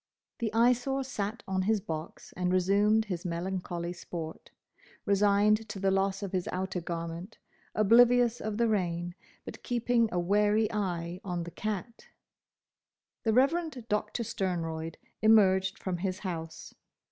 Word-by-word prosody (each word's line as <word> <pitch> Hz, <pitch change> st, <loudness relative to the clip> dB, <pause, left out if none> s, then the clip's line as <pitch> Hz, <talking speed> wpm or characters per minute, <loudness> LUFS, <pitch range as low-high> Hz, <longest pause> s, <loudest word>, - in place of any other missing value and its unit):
The 225 Hz, -3 st, -1 dB
Eyesore 245 Hz, +4 st, +2 dB
sat 225 Hz, -3 st, -4 dB
on 190 Hz, 0 st, 0 dB
his 215 Hz, +3 st, +2 dB
box 160 Hz, -3 st, -7 dB
and 180 Hz, 0 st, 0 dB
resumed 200 Hz, +4 st, +3 dB
his 180 Hz, -5 st, -4 dB
melancholy 175 Hz, 0 st, -3 dB
sport, 165 Hz, -2 st, -7 dB, 0.6 s
resigned 205 Hz, +2 st, +3 dB
to 195 Hz, -, -5 dB
the 195 Hz, 0 st, +2 dB
loss 195 Hz, +1 st, 0 dB
of 195 Hz, -, -4 dB
his 185 Hz, -2 st, -1 dB
outer 185 Hz, 0 st, -2 dB
garment, 170 Hz, +4 st, -5 dB, 0.4 s
oblivious 240 Hz, +2 st, +5 dB
of 215 Hz, -1 st, -3 dB
the 235 Hz, 0 st, +3 dB
rain, 175 Hz, -4 st, -1 dB, 0.3 s
but -, -, -9 dB
keeping 240 Hz, -1 st, +1 dB
a 180 Hz, -, -1 dB
wary 210 Hz, +4 st, +2 dB
eye 180 Hz, -3 st, -2 dB
on 175 Hz, -3 st, -3 dB
the 170 Hz, -, -8 dB
cat. 215 Hz, +3 st, -5 dB, 1.1 s
The 220 Hz, -, +1 dB
Reverend 275 Hz, 0 st, +1 dB
Doctor 210 Hz, +2 st, -1 dB
Sternroyd 165 Hz, -5 st, -3 dB, 0.2 s
emerged 190 Hz, -3 st, +4 dB
from 185 Hz, -2 st, -3 dB
his 185 Hz, +1 st, -2 dB
house. 165 Hz, -5 st, -6 dB
195 Hz, 135 wpm, -30 LUFS, 175-220 Hz, 1.1 s, oblivious